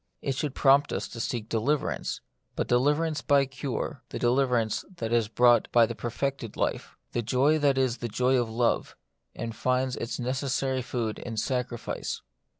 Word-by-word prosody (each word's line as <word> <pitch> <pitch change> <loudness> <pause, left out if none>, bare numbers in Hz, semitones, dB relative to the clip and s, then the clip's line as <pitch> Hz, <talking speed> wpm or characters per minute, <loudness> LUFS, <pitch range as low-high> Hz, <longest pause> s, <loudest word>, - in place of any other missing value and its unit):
It 135 - 0
should 140 +1 -3
prompt 140 +1 +4
us - - -2
to 115 - -8
seek 115 -1 -3
deliverance, 120 +7 -1 0.3
but - - -1
deliverance 150 +5 +2
by 140 -1 +4
cure: 135 0 -4
the - - -5
deliverance 120 -3 +1
that 115 0 -2
is 115 -3 +3
brought 120 +1 +4
by 120 - +6
a 115 - +1
perfected 120 -1 -3
life; - - -2
the 120 - -1
joy 130 +7 +2
that 140 -2 +3
is 130 -2 +1
the 120 - -4
joy 125 +4 +2
of 115 - -3
love, 115 +1 0 0.4
and 115 0 -5
finds 130 +2 0
its 115 - -4
necessary 130 +1 -1
food 115 -3 -3
in 115 -2 -6
sacrifice. 125 0 -3
125 Hz, 165 wpm, -28 LUFS, 115-135 Hz, 0.4 s, by